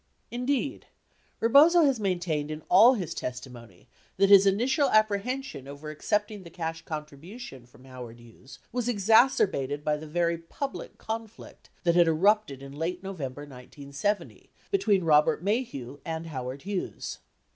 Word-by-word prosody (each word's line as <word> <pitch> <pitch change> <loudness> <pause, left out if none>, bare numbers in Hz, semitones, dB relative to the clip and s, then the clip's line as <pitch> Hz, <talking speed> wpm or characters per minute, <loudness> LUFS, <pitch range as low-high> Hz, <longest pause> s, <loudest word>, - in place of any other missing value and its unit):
Indeed, 260 +3 -2 0.5
Rebozo 305 +9 +6
has 275 -5 +2
maintained 175 -7 -1
in 155 0 -6
all 245 +4 +7
his 180 -8 -4
testimony 125 -6 -8 0.3
that 195 +1 +4
his 200 0 +8
initial 260 +8 +2
apprehension 215 - 0
over 145 +2 -8
accepting 205 +6 -2
the 170 - -12
cash 165 -1 -5
contribution 150 - -9
from 125 +1 -19
Howard 125 -3 -10
Hughes 120 +3 -15
was 245 0 -2
exacerbated 200 - +3
by 150 0 0
the 155 +1 -9
very 170 +1 0
public 270 +12 -6
conflict 225 0 -8
that 170 -2 +3
had 175 -1 +5
erupted 165 -4 +2
in 135 - -9
late 170 +5 -4
November 145 -8 -6
1970, 140 +8 -5 0.2
between 210 - +2
Robert, 150 +2 +3
Maheu 145 - -2
and 165 0 -4
Howard 130 -3 -6
Hughes. 195 -1 -5
170 Hz, 135 wpm, -27 LUFS, 145-215 Hz, 0.5 s, his